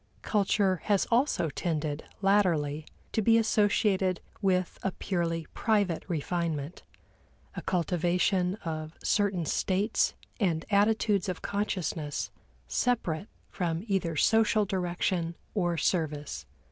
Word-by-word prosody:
Culture 200 -2 +2
has 205 -2 +3
also 235 - +2
tended, 155 -2 -2 0.2
latterly, 160 -7 +2 0.2
to 220 - +1
be 225 +2 +5
associated 205 -4 +2 0.2
with 185 -2 +1
a 195 - -1
purely 165 -3 -2
private 205 -7 +1
refinement, 165 -2 -2 0.7
a - - -5
cultivation 180 +1 +1
of 155 -1 -4
certain 195 -5 +1
states 195 +7 +1 0.2
and 170 -6 +1
attitudes 205 -1 +3
of 180 - -4
consciousness, 160 - -2 0.4
separate 200 - 0 0.2
from 170 -2 -2
either 180 -5 0
social 220 +4 +3
direction 175 -2 -1 0.2
or 175 -5 0
service. 150 - -1
180 Hz, 105 wpm, -29 LUFS, 165-200 Hz, 0.7 s, be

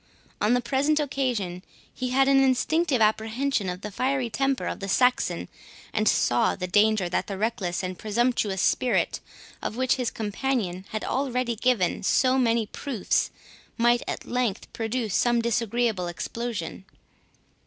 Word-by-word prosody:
On 215 +4 +3
the 245 - +1
present 280 +5 +1
occasion, 245 -11 -2 0.3
he 255 0 -3
had 270 +2 +3
an 275 0 +5
instinctive 270 +1 +2
apprehension 220 +1 +1
of 180 +1 -5
the 210 - -6
fiery 255 +2 -1
temper 270 +1 0
of - - -3
the 195 -1 -5
Saxon, 250 +4 +2 0.5
and 215 0 +3
saw 120 0 +2
the 185 - -4
danger 205 +1 +3
that 175 - -1
the 195 - -4
reckless 195 -5 -1
and 185 0 -4
presumptuous 215 -3 0
spirit, 250 - +1 0.4
of - - -3
which 255 0 +1
his 250 -3 0
companion 210 -4 -2
had 215 - -4
already 255 -3 -1
given 225 -5 +1
so 255 +6 +3
many 230 -2 +2
proofs, 235 0 -1 0.5
might 240 +1 +3
at - - -4
length 240 -5 -2
produce 225 -2 -2
some 240 +2 +3
disagreeable 230 -4 0
explosion. 195 +1 -5
235 Hz, 145 wpm, -26 LUFS, 205-255 Hz, 0.5 s, an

